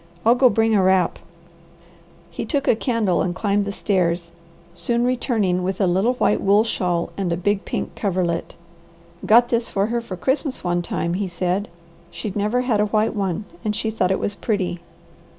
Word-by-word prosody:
I'll 230 - +7
go 250 +1 +5
bring 225 +1 +2
a 205 - +4
wrap." 185 -2 +2 1.1
He 170 - -4
took 280 +5 -1
the 240 - +3
candle 225 -6 0
and 175 -1 -1
climbed 200 +1 0
the 200 - -3
stairs, 175 -4 0 0.4
soon 235 +7 -1
returning 225 -7 0
with 185 +1 -2
a 195 - +3
little 190 +7 +2
white 245 - +1
wool 205 +2 +4
shawl 180 -6 -1
and 190 -3 -1
a 170 - 0
big 200 +1 0
pink - - -3
coverlet. 180 -4 -1 0.7
"Got 240 +2 +6
this 235 -1 0
for 195 0 0
her 235 +2 -1 0.2
Christmas 265 - -1
one 175 -1 0
time," 170 0 -2
he 195 +2 -1
said. 180 +3 -1 0.4
"She'd 210 -4 -6
never 210 +4 +1
had 245 -4 +1
a 210 - +2
white 215 +1 +1
one 195 0 -2 0.2
and 210 -1 -1
she 220 +1 -2
thought 185 -4 0
it 190 - +2
was 205 - -2
pretty." 200 -4 -2
200 Hz, 185 wpm, -22 LUFS, 180-225 Hz, 1.1 s, I'll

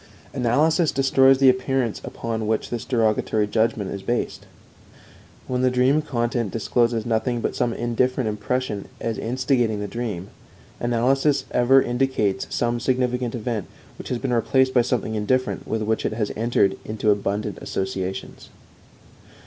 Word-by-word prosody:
Analysis 150 +6 +2
destroys 135 0 +4
the 135 0 +4
appearance 130 -2 0
upon 110 -2 -4
which 110 0 -1
this 120 -2 -3
derogatory 110 -3 +1
judgment 110 -2 0
is 100 - -5
based. 120 +4 -3 1.0
When 125 -1 -1
the 130 - +4
dream 130 +4 +3
content 120 -5 -1
discloses 115 +1 0
nothing 120 +1 0
but - - -2
some 120 - 0
indifferent 120 +2 0
impression 105 0 -2
as 115 -1 -3
instigating 120 -2 0
the 105 - -3
dream, 100 -4 -4 0.5
analysis 135 +4 +1
ever 130 +2 +5
indicates 120 -6 0
some 120 0 0
significant 125 -1 0
event, 115 -3 -3 0.3
which - - -7
has 125 - -1
been 125 +1 -2
replaced 130 +3 +2
by 125 - +5
something 115 -2 -1
indifferent 130 +5 -1
with 110 -1 -1
which 110 +1 0
it - - -1
has 110 -2 -2
entered 110 -4 +1
into 110 0 0
abundant 100 -1 -2
associations. 95 0 -4
120 Hz, 140 wpm, -23 LUFS, 110-130 Hz, 1.0 s, ever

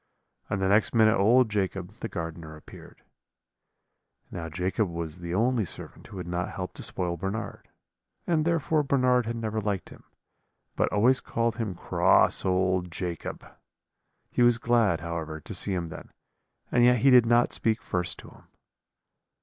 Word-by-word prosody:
and 100 - -1
the 95 - +1
next 105 +4 +2
minute 110 -1 +5
old 120 +6 +4
Jacob, 95 -3 -3
the - - -4
gardener, 80 -1 -6
appeared. 75 - -14 1.3
"Now 80 -1 -5
Jacob 90 +5 -1
was 85 0 -6
the 85 0 -4
only 120 +2 +2
servant 90 - -9
who 100 - -10
had 90 - -5
not 90 +1 -3
helped 90 -1 -6
to - - -7
spoil 85 -2 -3
Bernard, 95 +6 -5 0.6
and 160 -3 +1
therefore 165 -2 +1
Bernard 125 -4 +2
had 115 - -2
never 110 -1 -3
liked 100 -2 -3
him, - - -15 0.7
but - - +1
always 125 +5 +3
called 115 -1 -2
him 110 -6 -3
cross - - +3
old 95 -1 +1
Jacob. 85 0 -5 0.9
He - - 0
was 120 -1 +5
glad, 115 -8 +2
however, 80 -2 -5
to - - -8
see 100 - +1
him 85 -2 -3
then; 80 - -10 0.6
and 120 - +3
yet 125 0 +5
he 135 - +5
did 125 -2 +7
not 120 +1 +3
speak 110 0 +1
first 90 -1 -3
to - - -12
him. - - -18
100 Hz, 165 wpm, -27 LUFS, 90-120 Hz, 1.3 s, did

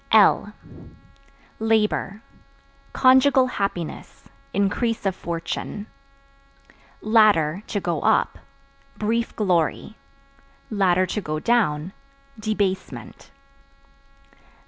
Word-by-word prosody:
L - - +4 1.1
Labor 220 -1 0 0.7
Conjugal 260 0 +5
happiness, 200 -9 -5 0.2
increase 205 +3 -1
of 190 -2 0
fortune. 170 +4 -5 1.2
Ladder 205 -7 +3
(To 205 - -2
go 175 -3 -2
up) - - +1 0.6
brief 230 +2 -1
glory; 185 +1 0 0.8
(to 185 -1 +1
go 155 -3 -3
down) 185 -6 +1 0.5
debasement. 205 -3 -3
205 Hz, 70 wpm, -23 LUFS, 180-220 Hz, 1.2 s, Conjugal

